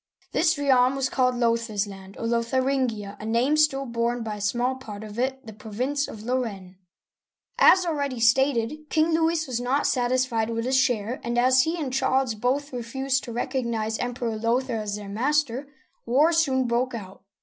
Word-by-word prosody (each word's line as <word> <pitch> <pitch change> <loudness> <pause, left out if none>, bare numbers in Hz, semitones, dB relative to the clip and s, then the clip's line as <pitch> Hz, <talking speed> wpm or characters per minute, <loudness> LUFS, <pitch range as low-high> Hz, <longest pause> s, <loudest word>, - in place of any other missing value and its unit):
This 320 0 +2
realm 265 -2 +3
was 270 -1 0
called 255 -1 +1
Lothair's 230 -3 0
land, 195 -1 -11
or - - -4
Lotharin'gia, 235 -3 -1
a - - -9
name 240 +6 +2
still 300 -3 +2
borne 235 0 -1
by 215 -2 -4
a - - -8
small 240 +5 0
part 220 -6 -9
of 215 +1 -8
it, 265 +1 -2
the 220 - -9
province 255 +6 -2
of 215 - -9
Lorraine'. 215 -7 -3 0.8
As 370 -1 +6
already 285 -6 -2
stated. 265 +4 +2
King 320 +1 +2
Louis 325 0 +1
was 245 -2 -3
not 260 +4 0
satisfied 245 -3 +1
with 230 0 -2
his 260 +1 +1
share, 245 -2 +1
and 235 0 -2
as 255 +1 +5
he 325 +2 -1
and 280 -6 -3
Charles 265 -2 +1
both 260 +6 -1
refused 265 +3 -2
to 240 - -7
recognize 235 -3 -2
Emperor 245 -2 -3
Lothair 235 +1 0
as 205 -1 -3
their 210 -1 -8
master, 270 +4 0 0.4
war 290 +8 +4
soon 270 -6 +2
broke 240 +1 0
out. 195 -3 -9
245 Hz, 175 wpm, -25 LUFS, 230-270 Hz, 0.8 s, As